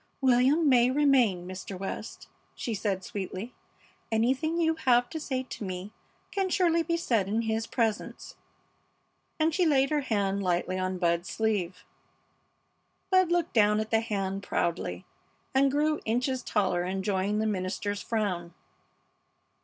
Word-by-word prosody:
"William 265 Hz, +5 st, +4 dB
may 250 Hz, -2 st, +5 dB
remain, 255 Hz, -10 st, +3 dB
Mr. 185 Hz, +1 st, -7 dB
West," 195 Hz, +1 st, -6 dB, 0.3 s
she 235 Hz, -, -3 dB
said, 195 Hz, -2 st, -2 dB
sweetly. 200 Hz, +4 st, -5 dB, 0.6 s
"Anything 260 Hz, +9 st, +1 dB
you 325 Hz, -1 st, +2 dB
have 245 Hz, -5 st, +2 dB
to 320 Hz, -, -4 dB
say 260 Hz, -4 st, -2 dB
to 250 Hz, -, -8 dB
me 185 Hz, +1 st, -5 dB, 0.4 s
can 385 Hz, -1 st, 0 dB
surely 340 Hz, -2 st, +3 dB
be 335 Hz, 0 st, 0 dB
said 230 Hz, -, +1 dB
in 220 Hz, +3 st, 0 dB
his 220 Hz, 0 st, -1 dB
presence," 225 Hz, -3 st, -2 dB, 1.0 s
and 315 Hz, +1 st, +2 dB
she 360 Hz, -, +2 dB
laid 275 Hz, -4 st, +3 dB
her 300 Hz, -1 st, +2 dB
hand 200 Hz, -6 st, 0 dB
lightly 180 Hz, 0 st, 0 dB
on 185 Hz, 0 st, -2 dB
Bud's 170 Hz, 0 st, 0 dB
sleeve. 195 Hz, -5 st, -1 dB, 1.3 s
Bud 370 Hz, -2 st, +4 dB
looked 345 Hz, -1 st, +1 dB
down 210 Hz, -1 st, +4 dB
at 215 Hz, 0 st, -3 dB
the 225 Hz, 0 st, +3 dB
hand 195 Hz, -3 st, -2 dB
proudly 165 Hz, -, -2 dB, 0.5 s
and 270 Hz, +1 st, +4 dB
grew 300 Hz, +2 st, +1 dB
inches 250 Hz, +3 st, 0 dB
taller 185 Hz, -6 st, 0 dB
enjoying 190 Hz, +2 st, -1 dB
the 215 Hz, -, 0 dB
minister's 205 Hz, 0 st, -2 dB
frown. 185 Hz, -7 st, -2 dB
220 Hz, 140 wpm, -28 LUFS, 190-270 Hz, 1.3 s, may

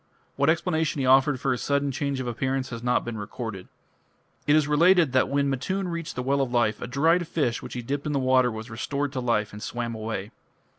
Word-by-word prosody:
What 140 Hz, +2 st, +2 dB
explanation 160 Hz, -1 st, +1 dB
he 135 Hz, -, 0 dB
offered 130 Hz, +1 st, +4 dB
for 135 Hz, -, 0 dB
his 125 Hz, -, -1 dB
sudden 140 Hz, 0 st, 0 dB
change 140 Hz, -1 st, -2 dB
of 130 Hz, -, -3 dB
appearance 130 Hz, +2 st, -2 dB
has 115 Hz, -1 st, -5 dB
not 125 Hz, +1 st, +1 dB
been 115 Hz, -2 st, -5 dB
recorded. 105 Hz, -2 st, -6 dB, 0.8 s
It 145 Hz, -, +5 dB
is 155 Hz, -2 st, +3 dB
related 165 Hz, 0 st, +4 dB
that 130 Hz, 0 st, +2 dB
when 140 Hz, 0 st, +1 dB
Matun 180 Hz, +8 st, -2 dB
reached 170 Hz, -1 st, -5 dB
the 125 Hz, -, -3 dB
Well 140 Hz, +2 st, +1 dB
of 130 Hz, -3 st, -1 dB
Life 120 Hz, -3 st, +1 dB
a -, -, -4 dB
dried 165 Hz, +7 st, +2 dB
fish 135 Hz, -9 st, -1 dB
which -, -, -8 dB
he 120 Hz, -, -4 dB
dipped 140 Hz, +4 st, -3 dB
in -, -, -1 dB
the 145 Hz, -, 0 dB
water 130 Hz, -1 st, +3 dB
was 110 Hz, 0 st, -7 dB
restored 140 Hz, +5 st, -3 dB
to 130 Hz, -, -2 dB
life 115 Hz, -4 st, 0 dB
and 105 Hz, -, -8 dB
swam 120 Hz, 0 st, -4 dB
away. 110 Hz, -2 st, -5 dB
130 Hz, 230 wpm, -26 LUFS, 120-145 Hz, 0.8 s, It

